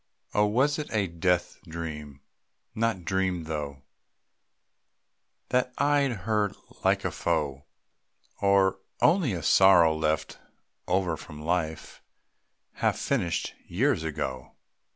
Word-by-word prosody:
Oh, 105 0 +3
was 135 +8 +2
it 150 - -5
a 105 -3 +1
death 90 0 0
dream 75 -4 -7 0.5
not 110 -6 -1
dreamed 95 -1 0
through, 75 -4 -5 1.7
That 125 0 0
eyed 145 -1 +3
her 105 -2 +1 0.3
like - - +2
a - - 0
foe? 70 -1 -1 0.8
Or 100 -1 +3 0.2
only 160 - +3
a 85 -3 -4
sorrow 90 -5 +6
left 80 0 -1 0.5
over 90 -2 +1
from 75 +1 -11
life, 80 0 -3 0.7
Half - - 0
finished 85 -2 -1
years 115 - +1
ago? 65 -5 -4
90 Hz, 110 wpm, -27 LUFS, 80-105 Hz, 1.7 s, sorrow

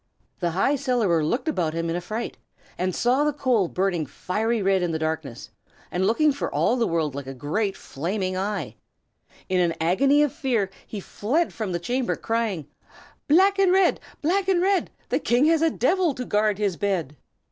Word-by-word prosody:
The 175 - 0
High 195 - +1
Cellarer 235 - +1
looked 240 - -1
about 170 - 0
him 165 0 -1
in 165 - -1
affright, 215 +7 -4 0.4
and 185 0 -2
saw 255 +4 +2
the 300 - +2
coal 255 -9 +1
burning 180 -4 -1
fiery 220 - -1
red 195 -1 +2
in 175 -1 0
the 160 - -1
darkness, 155 -5 -4 0.4
and 185 +2 +1
looking 300 +8 +3
for 285 - -3
all 240 - +2
the 235 -3 +1
world 160 -4 0
like 140 -1 -6
a 135 - -6
great 195 - -2
flaming 185 +5 -3
eye. 200 +2 -3 0.7
In 185 -1 +1
an 170 -2 +2
agony 275 - +3
of 295 - 0
fear 245 - -1 0.2
he 210 - -6
fled 270 - -1
from 215 -4 -3
the 175 - 0
chamber, 245 +8 -1
crying, 225 -9 -2 0.6
"Black 385 +6 +4
and 385 -2 +4
red! 375 -1 +3 0.2
black 375 +5 +1
and 380 -2 +3
red! 380 +1 +2 0.2
The - - +1
King 245 +4 +2
has 325 0 +3
a 325 - +4
devil 325 +3 +1
to 250 - -4
guard 210 -2 +1
his 200 -5 -1
bed." 180 -8 -1
210 Hz, 190 wpm, -24 LUFS, 175-275 Hz, 0.7 s, Black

